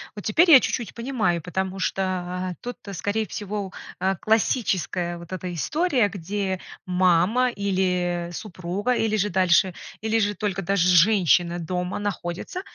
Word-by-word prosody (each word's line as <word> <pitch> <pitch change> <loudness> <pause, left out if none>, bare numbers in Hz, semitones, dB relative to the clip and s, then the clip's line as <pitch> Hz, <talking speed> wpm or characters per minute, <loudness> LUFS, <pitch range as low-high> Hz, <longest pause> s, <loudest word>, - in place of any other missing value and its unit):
Вот 205 - -8
теперь 330 +10 +4
я 275 - +11
чуть-чуть 240 -3 -3
понимаю, 230 -9 -1
потому 190 +3 -3
что 185 -1 -2
тут, 245 0 -6 0.2
скорее 205 +6 -1
всего, 205 -2 -5 0.3
а, 190 +1 +1
классическая 190 - 0
вот 170 +1 -12
эта 180 -1 -4
история, 275 - +1
где 195 0 -3 0.3
мама, 185 +7 +3
или 180 -4 -1
супруга, 185 +5 -3
или 220 -2 +1
же 210 +1 +1
дальше, 185 0 +3 0.3
или 220 +1 +1
же 205 -1 +1
только 195 -1 -2
даже 185 -1 +1
женщина 175 -2 +4
дома 180 +2 -3
находится, 205 - -4
190 Hz, 135 wpm, -24 LUFS, 180-215 Hz, 0.3 s, я